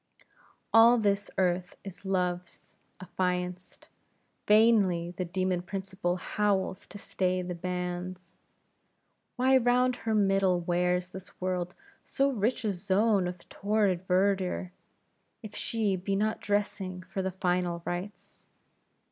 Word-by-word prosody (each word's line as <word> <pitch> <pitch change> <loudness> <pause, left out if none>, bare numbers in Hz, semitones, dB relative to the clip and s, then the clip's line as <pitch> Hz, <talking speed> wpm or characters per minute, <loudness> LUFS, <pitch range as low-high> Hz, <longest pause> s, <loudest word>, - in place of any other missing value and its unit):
All 230 +2 +8
this 205 -2 +1
Earth 180 -1 0
is 195 0 -10
Love's 180 -2 -3 0.2
affianced; 180 0 -3 0.6
vainly 205 -6 +4
the 180 +1 -4
demon 185 0 -1
Principle 190 -1 -3
howls 195 0 -1
to - - -10
stay 185 -2 -1
the 180 0 -4
banns. 180 0 -5 1.0
Why 260 +1 +4
round 250 0 +2
her 220 -2 -1
middle 195 -3 +3
wears 180 +1 0
this 190 0 -11
world 180 -1 -2 0.3
so 275 0 +1
rich 235 +1 -1
a 205 - +1
zone 195 +1 +2
of 180 -1 -8
torrid 200 -3 0
verdure, 185 -1 +1 0.7
if 215 - -9
she 215 -4 0
be 190 +2 -2
not 215 +2 0
dressing 195 -3 -2
for 190 +1 -4
the 190 - -1
final 180 -2 -1
rites? 180 +4 -6
185 Hz, 120 wpm, -29 LUFS, 180-205 Hz, 1.0 s, All